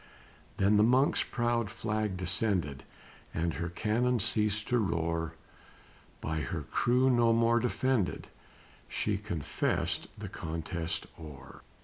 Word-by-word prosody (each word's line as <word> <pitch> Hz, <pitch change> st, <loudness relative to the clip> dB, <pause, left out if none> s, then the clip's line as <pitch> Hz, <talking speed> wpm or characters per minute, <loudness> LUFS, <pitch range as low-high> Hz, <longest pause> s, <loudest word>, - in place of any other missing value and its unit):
Then 100 Hz, +2 st, +4 dB
the 105 Hz, -, +6 dB
Monk's 130 Hz, +5 st, +4 dB
proud 120 Hz, -3 st, 0 dB
flag 105 Hz, -2 st, -2 dB
descended, 90 Hz, -6 st, 0 dB, 0.5 s
And 85 Hz, 0 st, 0 dB
her 85 Hz, +1 st, -3 dB
cannon 115 Hz, +8 st, +1 dB
ceased 105 Hz, -1 st, +1 dB
to 125 Hz, -, +3 dB
roar; 85 Hz, -4 st, -1 dB, 0.9 s
By 80 Hz, 0 st, -2 dB
her 75 Hz, +3 st, -3 dB
crew 125 Hz, -, +2 dB
no 120 Hz, -2 st, +4 dB
more 115 Hz, +1 st, +4 dB
defended, 125 Hz, -3 st, 0 dB, 0.6 s
She 105 Hz, -2 st, -1 dB
confessed 95 Hz, -8 st, -1 dB
the -, -, -6 dB
contest 80 Hz, 0 st, -3 dB
o'er. 70 Hz, -5 st, -11 dB
105 Hz, 115 wpm, -31 LUFS, 85-115 Hz, 0.9 s, the